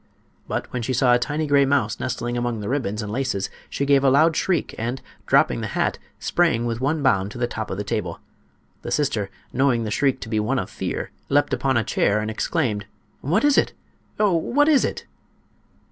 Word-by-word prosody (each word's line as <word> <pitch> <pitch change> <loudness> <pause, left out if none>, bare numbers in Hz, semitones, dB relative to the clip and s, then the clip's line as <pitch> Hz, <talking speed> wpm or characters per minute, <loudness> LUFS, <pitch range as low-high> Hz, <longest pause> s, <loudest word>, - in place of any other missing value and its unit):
But - - -4
when 125 - -2
she 130 +3 -2
saw 125 0 +4
a 120 - +4
tiny 150 +5 -1
gray 140 -1 +4
mouse 135 -6 +1
nestling 120 -1 -3
among 120 -2 -1
the 105 - -5
ribbons 115 -6 -1
and 105 - -5
laces 115 -5 -2 0.2
she 140 - -2
gave 140 -1 +4
a 135 - +5
loud 155 +4 +4
shriek, 175 -3 0
and, 120 +4 -3 0.3
dropping - - +3
the - - -2
hat, - - 0 0.2
sprang 145 -10 +1
with 115 0 -2
one 145 +2 0
bound 100 -7 +2
to - - -8
the 120 - +1
top 110 -2 -5
of 95 - -4
the 105 - -2
table. 90 -5 -3 0.6
The - - -6
sister, 110 -9 0 0.2
knowing 130 -3 +2
the 105 - -3
shriek 135 +3 +1
to - - -6
be 110 -1 0
one 115 +6 0
of 95 - -3
fear, - - -4 0.2
leaped 145 +1 +2
upon 135 -2 +1
a 115 - +2
chair 100 0 +1
and 110 +1 -2
exclaimed: 110 - -1 0.3
"What 170 +11 +1
is 290 -1 +5
it? - - 0 0.5
Oh! 210 -3 +3
what 280 - +2
is 300 -4 +5
it?" - - -3
125 Hz, 210 wpm, -23 LUFS, 110-145 Hz, 0.6 s, a